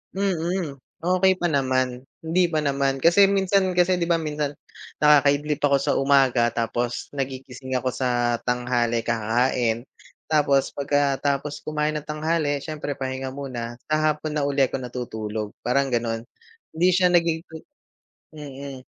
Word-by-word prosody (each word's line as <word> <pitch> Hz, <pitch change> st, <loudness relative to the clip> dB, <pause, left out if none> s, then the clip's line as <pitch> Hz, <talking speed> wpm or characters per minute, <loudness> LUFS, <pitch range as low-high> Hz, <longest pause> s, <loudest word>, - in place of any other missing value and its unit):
Mm. 180 Hz, -5 st, -1 dB, 0.3 s
Okey 185 Hz, +2 st, +2 dB
pa 175 Hz, -, +1 dB
naman. 130 Hz, -4 st, 0 dB, 0.2 s
Hindi 170 Hz, +3 st, +1 dB
pa 155 Hz, -, +1 dB
naman. 140 Hz, -2 st, 0 dB
Kasi 170 Hz, +7 st, +6 dB
minsan 195 Hz, -1 st, +2 dB
kasi 180 Hz, +1 st, +3 dB
'di 175 Hz, -, -1 dB
ba 165 Hz, -, +3 dB
minsan, 150 Hz, -2 st, -2 dB, 0.5 s
nakakaidlip 150 Hz, 0 st, +4 dB
ako 140 Hz, -1 st, +4 dB
sa 140 Hz, +1 st, 0 dB
umaga 135 Hz, -4 st, +3 dB
tapos 120 Hz, +1 st, -2 dB
nagigising 130 Hz, -1 st, -5 dB
ako 130 Hz, -, -1 dB
sa 120 Hz, -2 st, +1 dB
tanghali, 120 Hz, -1 st, 0 dB
kakain. 115 Hz, +1 st, 0 dB, 0.4 s
Tapos 140 Hz, -3 st, +2 dB
pagkatapos 145 Hz, 0 st, 0 dB
kumain 155 Hz, 0 st, -1 dB
nang 150 Hz, -, -3 dB
tanghali, 150 Hz, -1 st, -1 dB
siyempre 150 Hz, 0 st, -5 dB
pahinga 130 Hz, 0 st, -4 dB
muna, 125 Hz, -3 st, -6 dB
sa 155 Hz, -, +1 dB, 0.2 s
hapon 150 Hz, 0 st, -5 dB
na 150 Hz, -, 0 dB
uli 140 Hz, -1 st, +2 dB
ako -, -, -4 dB
natutulog. 110 Hz, -4 st, -5 dB
Parang 135 Hz, +3 st, +1 dB
ganon. 115 Hz, -2 st, -2 dB, 0.5 s
Hindi 170 Hz, +3 st, +3 dB
siya 180 Hz, 0 st, +4 dB
nagigi 165 Hz, -2 st, 0 dB, 0.7 s
mm. 140 Hz, -2 st, -8 dB
140 Hz, 135 wpm, -24 LUFS, 125-155 Hz, 0.7 s, Kasi